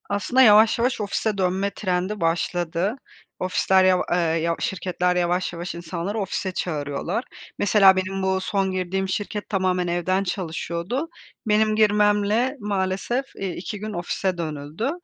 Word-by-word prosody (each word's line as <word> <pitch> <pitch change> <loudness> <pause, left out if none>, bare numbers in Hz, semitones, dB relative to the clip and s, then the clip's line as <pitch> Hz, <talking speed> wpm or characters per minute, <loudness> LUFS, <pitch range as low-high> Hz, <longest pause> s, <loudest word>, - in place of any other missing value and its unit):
Aslında, 205 +6 +2
yavaş, 220 -1 +6
yavaş 245 -1 +1
ofise 210 +1 -1
dönme 190 +1 0
trendi 185 +1 -2
başladı. 175 +4 0 0.4
Ofisler, 185 +1 +2
yav 185 -1 +4
eee, 175 - +3
yav 165 -1 +1
şirketler, 180 -1 -1
yavaş, 180 +1 0
yavaş 170 +1 -5
insanları 175 +5 -4
ofise 190 -1 -2
çağırıyorlar. 160 - -3 0.4
Mesela 195 -1 +6
benim 190 +1 -2
bu 190 0 +1
son 195 0 0
girdiğim 185 +1 -2
şirket 205 +1 -3
tamamen 185 -3 0
evden 175 +3 0
çalışıyordu. 180 - -3 0.4
Benim 215 0 +3
girmemle 210 +4 +3
maalesef, 200 +5 -1
eee, 195 - -3
2 195 +3 -6
gün 215 +1 -5
ofise 180 +1 -2
dönüldü. 155 - -3
190 Hz, 135 wpm, -23 LUFS, 175-210 Hz, 0.4 s, yavaş